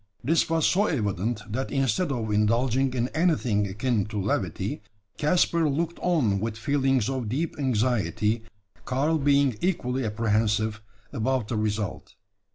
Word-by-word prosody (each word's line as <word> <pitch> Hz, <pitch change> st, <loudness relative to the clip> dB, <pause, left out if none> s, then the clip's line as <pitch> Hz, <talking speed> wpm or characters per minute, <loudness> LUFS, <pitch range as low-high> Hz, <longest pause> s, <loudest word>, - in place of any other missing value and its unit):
This 160 Hz, +7 st, +2 dB
was 165 Hz, -1 st, +2 dB
so 205 Hz, +3 st, +3 dB
evident, 105 Hz, -, -1 dB
that 125 Hz, +6 st, -3 dB
instead 135 Hz, -, 0 dB
of 115 Hz, -5 st, -2 dB
indulging 120 Hz, +5 st, +2 dB
in 120 Hz, 0 st, 0 dB
anything 145 Hz, -, +1 dB
akin 105 Hz, +1 st, 0 dB
to 105 Hz, -1 st, -4 dB
levity, 95 Hz, -, -2 dB, 0.4 s
Caspar 165 Hz, 0 st, +2 dB
looked 165 Hz, +4 st, -2 dB
on 135 Hz, -, +1 dB
with 110 Hz, +1 st, -3 dB
feelings 135 Hz, -1 st, +1 dB
of 130 Hz, -5 st, -2 dB
deep 150 Hz, +8 st, -2 dB
anxiety, 115 Hz, -3 st, 0 dB, 0.4 s
Karl 145 Hz, +5 st, 0 dB
being 140 Hz, -3 st, +3 dB
equally 135 Hz, -8 st, 0 dB
apprehensive 110 Hz, 0 st, 0 dB, 0.3 s
about 125 Hz, -2 st, -1 dB
the 120 Hz, -, -1 dB
result. 105 Hz, -2 st, -3 dB
125 Hz, 135 wpm, -26 LUFS, 110-140 Hz, 0.4 s, so